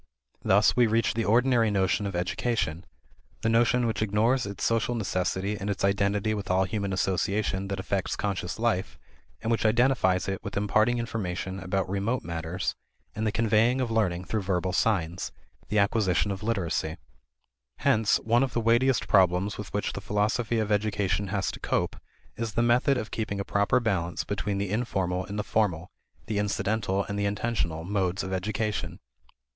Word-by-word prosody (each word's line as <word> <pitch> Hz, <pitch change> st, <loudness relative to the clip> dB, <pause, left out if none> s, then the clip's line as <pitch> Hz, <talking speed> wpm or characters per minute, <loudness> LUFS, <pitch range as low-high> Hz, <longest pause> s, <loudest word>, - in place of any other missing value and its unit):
Thus 100 Hz, +2 st, +4 dB
we 120 Hz, -1 st, +5 dB
reach 115 Hz, 0 st, +1 dB
the 115 Hz, -1 st, -1 dB
ordinary 120 Hz, 0 st, +3 dB
notion 100 Hz, 0 st, +1 dB
of 100 Hz, -, -5 dB
education: 90 Hz, -1 st, -1 dB, 0.6 s
the 110 Hz, -, +2 dB
notion 120 Hz, +2 st, +3 dB
which 110 Hz, -1 st, -1 dB
ignores 110 Hz, +4 st, +2 dB
its 100 Hz, -, -6 dB
social 115 Hz, +1 st, +1 dB
necessity 95 Hz, -1 st, -1 dB
and 100 Hz, 0 st, -4 dB
its 100 Hz, -1 st, 0 dB
identity 100 Hz, +2 st, +1 dB
with 100 Hz, -3 st, -4 dB
all 95 Hz, +1 st, +3 dB
human 100 Hz, 0 st, -2 dB
association 95 Hz, +1 st, 0 dB
that 100 Hz, -1 st, -3 dB
affects 95 Hz, 0 st, -1 dB
conscious 95 Hz, -3 st, -3 dB
life, 110 Hz, -5 st, -1 dB, 0.5 s
and 115 Hz, -, 0 dB
which 115 Hz, -, +1 dB
identifies 110 Hz, -5 st, +3 dB
it 95 Hz, 0 st, -3 dB
with 100 Hz, -1 st, -5 dB
imparting 110 Hz, +4 st, +2 dB
information 95 Hz, -5 st, -3 dB
about 95 Hz, 0 st, -1 dB
remote 100 Hz, +6 st, -1 dB
matters 85 Hz, +2 st, -3 dB, 0.4 s
and 110 Hz, +2 st, -2 dB
the -, -, +1 dB
conveying 115 Hz, +3 st, +2 dB
of 125 Hz, -3 st, -1 dB
learning 95 Hz, -5 st, 0 dB
through 110 Hz, +2 st, -1 dB
verbal 95 Hz, -1 st, -1 dB
signs: 90 Hz, -5 st, 0 dB, 0.4 s
the 105 Hz, -, -1 dB
acquisition 100 Hz, -1 st, +2 dB
of 95 Hz, -1 st, -5 dB
literacy. 90 Hz, -7 st, -1 dB, 0.8 s
Hence 110 Hz, -1 st, +3 dB
one 120 Hz, +2 st, +3 dB
of 135 Hz, -1 st, 0 dB
the -, -, +1 dB
weightiest 120 Hz, +2 st, +2 dB
problems 95 Hz, +2 st, +3 dB
with 105 Hz, -, -6 dB
which 105 Hz, -, -2 dB
the 100 Hz, -, -5 dB
philosophy 105 Hz, +4 st, 0 dB
of 110 Hz, -1 st, -1 dB
education 105 Hz, -1 st, 0 dB
has 100 Hz, 0 st, -1 dB
to -, -, -9 dB
cope -, -, -1 dB, 0.4 s
is 115 Hz, -2 st, -4 dB
the 115 Hz, -, +2 dB
method 125 Hz, +3 st, +3 dB
of 110 Hz, -3 st, -4 dB
keeping 105 Hz, -3 st, -3 dB
a 100 Hz, -, -2 dB
proper 100 Hz, +4 st, +2 dB
balance 95 Hz, -8 st, -1 dB
between 100 Hz, 0 st, -2 dB
the 100 Hz, -1 st, -2 dB
informal 95 Hz, -5 st, -1 dB
and 100 Hz, -, -5 dB
the 105 Hz, -, -1 dB
formal, 90 Hz, -6 st, 0 dB, 0.3 s
the 105 Hz, -2 st, -1 dB
incidental 100 Hz, -1 st, 0 dB
and 100 Hz, +1 st, -4 dB
the 100 Hz, -, 0 dB
intentional, 100 Hz, -6 st, -2 dB
modes 95 Hz, 0 st, -1 dB
of 95 Hz, 0 st, -4 dB
education. 105 Hz, +2 st, -2 dB
100 Hz, 175 wpm, -27 LUFS, 95-115 Hz, 0.8 s, we